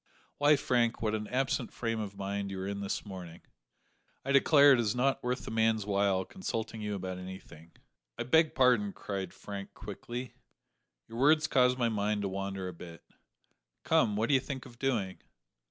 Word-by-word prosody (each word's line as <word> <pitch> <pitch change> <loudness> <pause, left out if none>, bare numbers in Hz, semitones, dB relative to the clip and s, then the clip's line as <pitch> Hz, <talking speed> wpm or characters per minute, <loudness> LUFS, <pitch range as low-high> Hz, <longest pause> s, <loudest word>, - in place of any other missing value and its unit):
Why, 145 +1 +6
Frank, 120 -4 +1
what 110 -1 +1
an 105 -1 -2
absent 130 -1 -1
frame 115 -1 -2
of 100 -2 -5
mind 100 0 -3
you 95 -1 -5
are 95 - -3
in 100 0 -3
this 100 +2 -3
morning! 90 -4 -9 0.8
I 135 - -1
declare 140 +1 +7
it 125 - +3
is 115 0 0
not 135 +2 +1
worth 125 +2 -2
a - - -4
man's 110 -2 +2
while 100 -2 +1
consulting 115 - -4
you 105 -1 -2
about 95 -1 -5
anything." 90 -3 -11 0.4
"I 120 - -2
beg 160 +6 +3
pardon," 125 -6 +3
cried 95 -3 -5
Frank 100 -1 -8
quickly, 120 +4 -7 0.7
"your 115 - -7
words 150 +3 +5
caused 125 -3 +3
my 120 -2 +1
mind 105 -1 -1
to 100 - -1
wander 95 0 -4
a 90 - -6
bit. 85 0 -11 0.8
Come, 105 - +3
what 110 +2 +1
do - - +3
you 135 - +6
think 135 -1 -6
of 120 -2 -14
doing?" 110 -9 -1
110 Hz, 185 wpm, -31 LUFS, 100-125 Hz, 0.8 s, declare